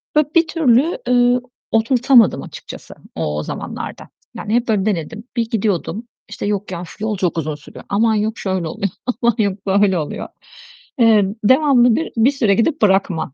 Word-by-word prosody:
böyle 300 -2 +3
bir 335 -1 +4
türlü, 310 -1 +2
eee, 245 0 +3 0.3
oturtamadım 235 +1 +3
açıkçası - - -11 0.2
o 75 0 -2
o 75 - -3
zamanlarda. - - -7 0.3
Yani 210 - -4
hep 240 0 +1
böyle 210 -3 +1
denedim. 210 +3 -3
Bir 230 -1 0
gidiyordum. 210 0 -2 0.2
İşte, 210 - -6
"Yok 205 -1 -2
ya, 175 - -5
of 180 +4 -12
yol 215 -1 -2
çok 180 -2 -1
uzun 155 -2 -2
sürüyor. 145 - -14
Aman 220 +2 +2
yok 215 +1 -1
şöyle 185 -4 -2
oluyor. 195 +5 -3 0.3
Aman 235 -2 +2
yok 200 -3 -1
böyle 195 -1 +3
oluyor." 150 - -5 0.7
Eee, 220 -3 +5 0.2
devamlı 255 -1 +4
bir 325 - -3
bir 230 +5 +4
süre 225 -8 +1
gidip 290 +7 0
bırakma 190 -8 +1
215 Hz, 170 wpm, -18 LUFS, 195-245 Hz, 0.7 s, Eee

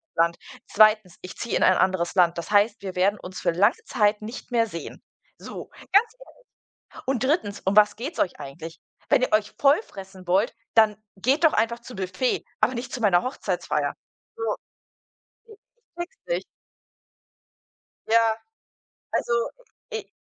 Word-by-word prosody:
Land. 170 +1 +2 0.3
2.: 215 -3 +4
Ich 185 - -9
ziehe 235 - -3
in - - +2
ein 185 - +5
anderes 185 -2 +1
Land. 175 -2 +4
Das 170 +3 -5
heißt, 210 +2 +3
wir 190 -2 -6
werden 195 +3 +2
uns 185 +1 -8
für - - +1
lange 200 +7 +3
Zeit 210 0 +1
nicht 225 +4 -8
mehr 230 -2 +2
sehen.“ 170 -6 -8 0.4
So, - - -9 0.2
ganz 445 +3 +5 0.7
ehrlich. - - -15
„Und 265 -1 0
3.: 260 - 0
Um 190 +1 +1
was 210 0 +6
geht's 275 +9 -5
euch 180 - 0
eigentlich? 145 +4 -9 0.3
Wenn - - +4
ihr 255 - 0
euch 215 -1 +2
voll 285 +8 +4
fressen 190 - -12
wollt, 195 +5 +2 0.2
dann 220 -2 +5 0.2
geht 260 - +1
doch 320 - +6
einfach 230 +2 +1
zu 245 0 -11
Büffet, 190 +6 -1 0.2
aber 255 - +3
nicht 250 +2 -5
zu 250 - -4
meiner 185 -5 +4
Hochzeitsfeier.“ 255 - -2 0.4
So, 460 - -7 1.1
äh, 445 - -14
ich - - -17 0.4
checks 350 +7 -5
nicht. - - -1 1.6
Ja, 225 0 +4 0.8
also, - - 0 0.6
i 450 - -4
215 Hz, 160 wpm, -25 LUFS, 185-250 Hz, 1.6 s, was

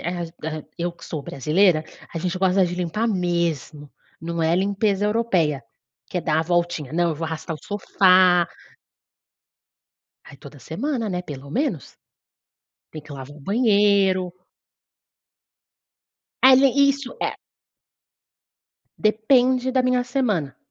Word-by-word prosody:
a 165 -2 -5
a - - -17
eu 175 0 -2
que 170 0 -15
sou 150 -3 -5
brasileira, 155 +5 +2 0.3
a 165 - -4
gente 180 +2 -2
gosta 185 0 +3
de 175 - -4
limpar 180 +6 -2
mesmo, 170 - -2 0.3
não 170 0 -3
é 165 +2 +2
limpeza 200 +1 0
europeia, 185 - +1 0.5
que 180 - -3
é - - -2
dar 160 -1 +1
a - - 0
voltinha, 170 -4 -1
não, 170 0 +1
eu - - -2
vou 160 +2 -4
arrastar 160 +1 -5
o - - -10
sofá. 185 -3 +4 1.8
Aí - - -13
toda 140 +1 -13
semana, 230 - -3
né, 180 0 -2
pelo 140 -4 -9
menos. 245 - -2 1.0
Tem 155 - -8
que 150 - -14
lavar 135 +2 -9
o - - -14
banheiro. 200 - +2 2.1
Ai 260 0 +8
le 275 - +6 0.2
Isso, 275 -2 -5
é - - -2 1.6
Depende 250 +4 +2
da 260 0 +2
minha 255 0 +2
semana. 215 - -1
180 Hz, 135 wpm, -22 LUFS, 160-210 Hz, 2.1 s, Ai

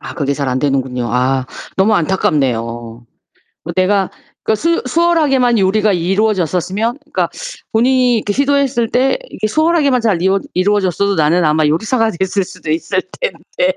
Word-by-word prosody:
아 - - -8
그게 140 -2 -1
잘 140 -2 -2
안되는군요. 130 -2 -1
아 130 +1 +1 0.3
너무 205 +3 +3
안타깝네요. 150 - +1 1.0
뭐 170 - -3
내가 190 +1 +2 0.3
그니까 220 - +1
수 335 +1 +1
수월하게만 275 -6 +2
요리가 200 +2 +2
이루어졌었으면 195 - 0
그러니까 295 0 -2 0.4
본인이 250 +1 +3
이렇게 210 - -2
시도했을 275 -4 +1
때 265 - +2
이렇게 215 - -3
수월하게만 295 -1 +2
잘 200 -7 +1
이루 190 +1 +3 0.2
이루어졌어도 200 +1 +1
나는 165 +1 +2
아마 155 0 +2
요리사가 220 +8 +1
됐을 190 +2 -1
수도 155 - -8
있을 185 +4 0 0.2
텐데. - - -1
200 Hz, 380 characters per minute, -16 LUFS, 165-250 Hz, 1.0 s, 너무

